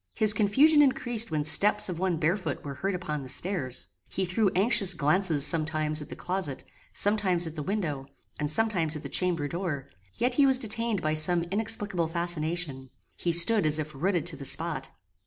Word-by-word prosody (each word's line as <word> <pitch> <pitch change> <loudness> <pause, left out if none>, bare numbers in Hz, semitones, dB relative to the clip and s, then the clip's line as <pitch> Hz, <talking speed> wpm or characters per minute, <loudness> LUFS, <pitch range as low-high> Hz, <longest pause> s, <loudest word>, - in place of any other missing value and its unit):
His 215 -2 +5
confusion 270 +9 +4
increased 240 -5 +2
when 155 -2 -2
steps 160 +7 +4
of 175 -3 -5
one 185 -2 -1
barefoot 165 -1 -2
were 140 - -6
heard 190 +8 -3
upon 150 -5 -5
the 130 - -9
stairs. 130 - -2 0.2
He 190 - -2
threw 190 +3 +1
anxious 195 -1 +4
glances 155 -1 +2
sometimes 155 -1 0
at 150 - -10
the - - -8
closet, 180 -7 -4 0.3
sometimes 200 -4 +2
at 160 - -6
the 155 - -6
window, 150 -7 -4 0.3
and 150 -1 -2
sometimes 170 -3 +2
at 150 - -7
the - - -7
chamber 170 -5 0
door, 150 -5 -5 0.3
yet 245 +1 -1
he 275 +2 +3
was 265 -1 +4
detained 230 -3 -3
by 155 0 0
some 170 +2 +3
inexplicable 205 -4 0
fascination. 165 -5 -3 0.3
He 175 - -2
stood 175 +6 +4
as 155 0 +2
if 155 0 -5
rooted 170 +3 -1
to 170 -2 -1
the 140 - -9
spot. 150 -2 -2
170 Hz, 185 wpm, -27 LUFS, 155-200 Hz, 0.3 s, His